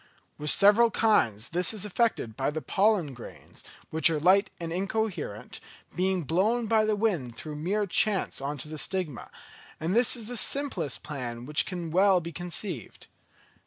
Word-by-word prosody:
With 150 0 +1
several 210 +7 +6
kinds 125 - +1
this 180 +5 0
is 210 - -1
effected 210 - -1
by 135 +3 -1
the 155 +1 -4
pollen 195 -8 +1
grains, 120 - -11 0.3
which 160 0 +5
are 160 -2 -1
light 190 +5 +4
and 165 -1 -5
incoherent, 195 - -4 0.4
being 185 0 0
blown 210 - +1
by 220 0 +2
the 215 0 +1
wind 175 - -1
through 150 +5 -7
mere 200 +7 -1
chance 200 -4 +1
on 145 +2 -4
to 135 - -5
the 155 0 -7
stigma; 180 -9 -3 0.5
and 165 +5 -2
this 240 +1 +4
is 230 -3 -5
the 245 0 -3
simplest 240 - 0
plan 125 -5 -6
which 150 +2 +1
can 175 -3 -5
well 190 +1 +4
be 170 0 -7
conceived. 175 - -6
180 Hz, 165 wpm, -27 LUFS, 150-210 Hz, 0.5 s, several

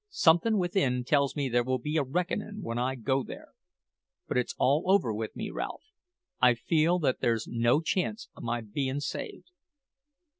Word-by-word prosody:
Something 210 - +4
within 175 -9 +1
tells 140 +1 +2
me 145 -2 0
there 120 -1 +2
will 130 +1 0
be 150 +5 -4
a - - +4
reckoning 185 +8 -3
when 115 -4 -3
I 130 +2 0
go 130 +2 0
there. - - -9 0.8
But - - -3
it's 125 - -1
all 145 +5 +2
over 190 - +3
with 110 +1 -4
me, - - -4
Ralph. - - -5 0.6
I 125 -1 +6
feel 160 +8 +2
that 145 -7 0
there's 115 -2 +1
no 120 +5 +2
chance 195 +6 -1
o' - - -11
my 120 0 -2
bein' 130 +6 -2
saved." 380 - -6
135 Hz, 175 wpm, -29 LUFS, 120-175 Hz, 0.8 s, I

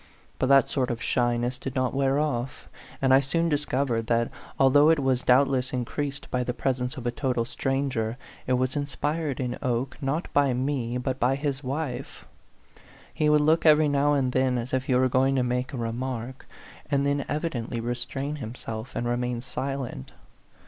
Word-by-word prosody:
But 130 - +2
that 140 -1 +6
sort 130 -3 -1
of 120 - -2
shyness 120 +1 0
did 135 - -6
not 130 -1 0
wear 135 0 +2
off; 135 -4 -2 0.4
and 130 -1 +5
I 135 - +8
soon 165 +5 0
discovered 135 -6 0
that, 115 0 +1 0.3
although 145 +3 +6
it 165 - +5
was 135 -3 +1
doubt 130 +3 +5
less 130 -1 -1
increased 140 +3 -3
by 125 0 +1
the 125 0 -3
presence 130 -1 -1
of 125 - -7
a 120 - +1
total 125 -3 -1
stranger, 125 -3 -1 0.3
it 130 - +2
was 130 +2 0
inspired 145 0 -2
in 125 -2 -3
Oke, 130 +3 -2
not 145 +5 -1
by 140 -3 +3
me, 125 -2 -1
but 130 +1 -2
by 125 +3 +2
his 140 0 -3
wife. 135 0 -4 0.9
He 150 - +2
would 150 0 +5
look 160 +2 +3
every 155 -1 +6
now 145 0 +2
and 135 -3 +1
then 130 -1 +2
as 120 +2 -4
if 130 0 0
he 130 - +1
were 130 +1 +4
going 130 +2 +2
to 130 - +2
make 125 +1 -1
a 135 - -5
re 115 -1 -2
mark, 125 +1 -5 0.4
and 140 -1 +1
then 140 0 +1
evidently 130 -7 -2
restrain 120 +5 -3
himself, 115 -1 -7
and 120 - -1
remain 120 0 -1
silent. 130 - -5
130 Hz, 185 wpm, -26 LUFS, 125-140 Hz, 0.9 s, I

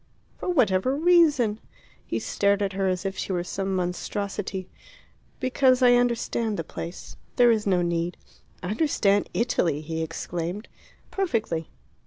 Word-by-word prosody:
"For - - -3
whatever 255 - +2
reason?" 300 -9 +4 0.4
He - - -3
stared 200 0 +1
at 195 -1 -2
her 195 0 0
as 185 +1 -1
if 195 0 -2
she - - -3
were 175 -2 0
some 195 +1 -3
monstrosity. 190 +1 -3 0.7
"Because 255 0 +3
I 245 -1 +7
understand 235 -3 +1
the 165 - -2
place. 170 +2 -8 0.2
There 245 -1 +6
is 215 -2 0
no 180 -2 +3
need." 170 0 -1 0.5
"Understand 205 - +1
Italy!" 175 -9 +1
he 160 +1 -4
exclaimed. 170 +5 -4 0.4
"Perfectly." 225 - -1
200 Hz, 135 wpm, -25 LUFS, 180-245 Hz, 0.7 s, I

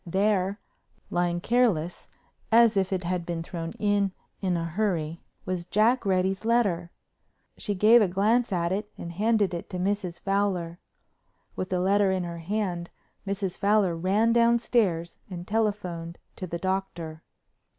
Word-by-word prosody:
There, 195 +2 +1 0.5
lying 175 0 0
careless 210 -9 +1 0.4
as 230 -1 +6
if 190 -1 +1
it 185 -1 -1
had 180 0 -1
been 170 -1 -4
thrown 165 -1 -5
in 205 -2 +1 0.3
in 185 -3 +1
a 165 - -2
hurry, 170 -3 -1 0.2
was 185 -2 -2
Jack 220 +5 +2
Reddy's 190 +1 +1
letter. 205 -7 +1 0.7
She 205 - -3
gave 220 +5 +6
a 205 - +4
glance 215 +6 +2
at 170 -2 0
it 210 +2 -2
and 170 - -6
handed 210 +1 +1
it 170 - -5
to 185 - -4
Mrs. 185 -2 -2
Fowler. 190 -4 -1 0.8
With 185 - -3
the 185 - 0
letter 195 +2 +3
in 190 -1 0
her 170 -1 -5
hand 175 -1 -2 0.4
Mrs. 195 -2 -3
Fowler 200 -4 +3
ran 200 +7 +2
downstairs 235 -7 +2
and 175 -1 -7
telephoned 190 -6 -2 0.2
to 185 - -6
the 170 - -3
Doctor. 170 -4 -3
190 Hz, 150 wpm, -27 LUFS, 175-210 Hz, 0.8 s, as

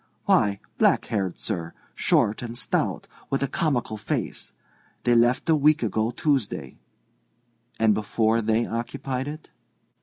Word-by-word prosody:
"Why, 100 -1 +3 0.2
black - - +4
haired, 95 -5 -2
sir, 85 -6 -4 0.2
short, 105 - +2
and 120 -1 -5
stout, 120 - -1 0.2
with 135 0 0
a - - +1
comical 125 -7 -1
face. 105 - -3 0.5
They 120 - +3
left 120 +2 +3
a 160 - +5
week 150 -1 +3
ago 110 +1 0
Tuesday." 125 - -1 1.0
"And 110 -1 +4
before 110 +2 +1
they 110 +2 +1
occupied 130 +3 -3
it?" 150 +1 -8
115 Hz, 130 wpm, -25 LUFS, 110-135 Hz, 1.0 s, a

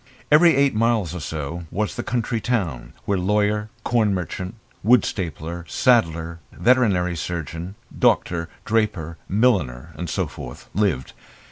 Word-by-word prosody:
Every 165 +2 +7
eight 140 0 +3
miles 110 -6 +1
or 90 - -4
so 80 +2 -5
was 105 +3 -2
the 120 - -2
country 120 -1 -1
town, 85 - -2
where 100 -2 +1
lawyer, 105 +2 +1
corn 110 -5 +2
merchant, 90 +3 -4 0.3
wool 120 0 +6
stapler, 85 -1 -4
saddler, 85 -9 +2
veterinary 100 -9 +2
surgeon, 85 +3 -5 0.2
doctor, 85 -1 +2 0.2
draper, 105 -8 0
milliner 95 - +1
and 90 -2 -5
so - - 0
forth 60 0 -10
lived. 90 - 0
95 Hz, 130 wpm, -23 LUFS, 85-115 Hz, 0.3 s, Every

